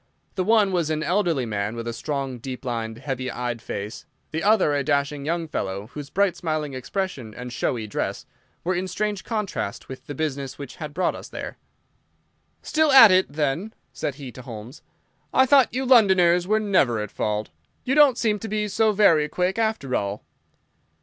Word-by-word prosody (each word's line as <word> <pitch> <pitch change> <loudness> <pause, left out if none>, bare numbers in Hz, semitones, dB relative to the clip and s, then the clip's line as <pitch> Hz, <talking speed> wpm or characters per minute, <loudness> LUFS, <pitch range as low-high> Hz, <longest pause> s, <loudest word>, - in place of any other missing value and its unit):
The 185 - -1
one 210 -1 +4
was 170 -4 0
an 155 -1 -1
elderly 175 -8 +1
man, 105 0 -2
with 115 0 -5
a 115 - -2
strong, 135 0 -3
deep 130 +2 -7
lined, 115 -2 -3
heavy 130 -1 -4
eyed 120 -2 -4
face; 105 0 -6 0.2
the 160 - -2
other 205 -6 +3
a 140 -1 0
dashing 140 +1 0
young 165 0 -1
fellow, 100 -5 -4
whose 145 -2 -7
bright, 195 +1 +1
smiling 155 -4 -3
expression 130 - -4
and 125 0 -7
showy 120 -2 -1
dress 105 - -3 0.4
were 185 - 0
in 185 +1 -2
strange 205 +1 -2
contrast 210 - -4
with 130 0 -9
the 145 - -6
business 140 -3 -3
which 140 -3 -9
had 150 -2 -7
brought 185 - +1
us - - -9
there. - - -7 1.0
"Still 315 -1 +2
at 230 -6 +10
it, 185 -4 +3
then?" 150 +8 -2 0.2
said 140 - -3
he 135 -3 -8
to 130 - -11
Holmes. 120 +1 -9 0.5
"I 260 - +5
thought 270 -1 +5
you 260 +3 -2
Londoners 185 -8 +5
were 215 +2 +3
never 185 - +2
at 105 -1 -4
fault. 105 0 -2 0.3
You 260 - 0
don't 285 -4 +6
seem 215 -4 +1
to 225 - -6
be 210 0 -1
so 215 +2 +2
very 165 -7 +4
quick, 185 +6 -1
after 220 - 0
all." 100 0 -2
155 Hz, 185 wpm, -24 LUFS, 125-200 Hz, 1.0 s, at